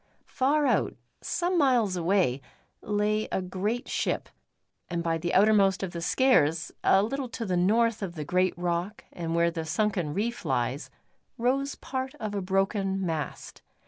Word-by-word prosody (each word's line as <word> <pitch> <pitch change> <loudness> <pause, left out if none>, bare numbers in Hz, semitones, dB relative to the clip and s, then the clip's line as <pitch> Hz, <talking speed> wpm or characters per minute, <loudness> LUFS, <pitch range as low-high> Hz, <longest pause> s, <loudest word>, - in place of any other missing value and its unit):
Far 290 +3 +1
out, - - +1 0.3
some 350 0 0
miles 245 -9 +3
away, 170 -7 +1 0.4
lay 210 +1 0
a - - 0
great 195 +7 -3
ship; - - -1 0.6
and 170 -1 -2
by 165 -1 0
the 175 +2 -2
outermost 200 -1 +4
of 185 - -3
the 170 - -5
Skares 165 - +2
a 195 +1 +5
little 265 +3 -3
to 230 -1 -5
the 185 -3 0
north 220 +5 +2
of 185 -3 -4
the 150 -2 -5
great 180 +3 +1
rock 175 +4 -2
and 165 -1 -3
where 170 0 +3
the 165 -1 -4
sunken 175 -2 -1
reef 235 +4 -2
lies, 130 -2 -1 0.5
rose 270 +4 0
part 265 +1 -5
of 215 -7 -5
a 200 - -1
broken 195 0 0
mast. 160 -4 -4
195 Hz, 160 wpm, -27 LUFS, 170-230 Hz, 0.6 s, a